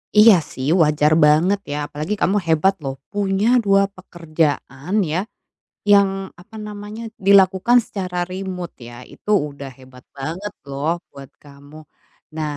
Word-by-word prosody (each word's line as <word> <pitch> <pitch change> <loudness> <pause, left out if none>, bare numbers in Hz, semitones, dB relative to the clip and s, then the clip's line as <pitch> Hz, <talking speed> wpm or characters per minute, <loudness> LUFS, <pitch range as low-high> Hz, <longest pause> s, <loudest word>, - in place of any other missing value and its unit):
Iya 215 0 +8 0.2
sih 130 +1 -5 0.2
wajar 150 0 +2
banget 170 +7 +3
ya, - - -2
apalagi 155 +8 -4
kamu 200 +2 +2
hebat 165 +5 +3
loh 135 0 -4 0.2
punya 200 +1 0 0.2
dua 195 -1 +4
pekerjaan 160 -3 -3
ya, 160 +2 -1 0.7
yang 200 -1 +6 0.3
apa 180 +5 -15
namanya, 210 +1 -8
dilakukan 195 +3 +4
secara 185 -5 -6
remote 185 -2 -6
ya 120 - -11
itu 210 - -9 0.2
udah 140 -1 -9
hebat 130 -1 -16
banget 175 +9 -5 0.2
loh 155 +5 -2
buat 140 -1 -13
kamu. 145 +1 -15 0.6
Nah, 150 -2 -3
180 Hz, 135 wpm, -20 LUFS, 150-200 Hz, 0.7 s, Iya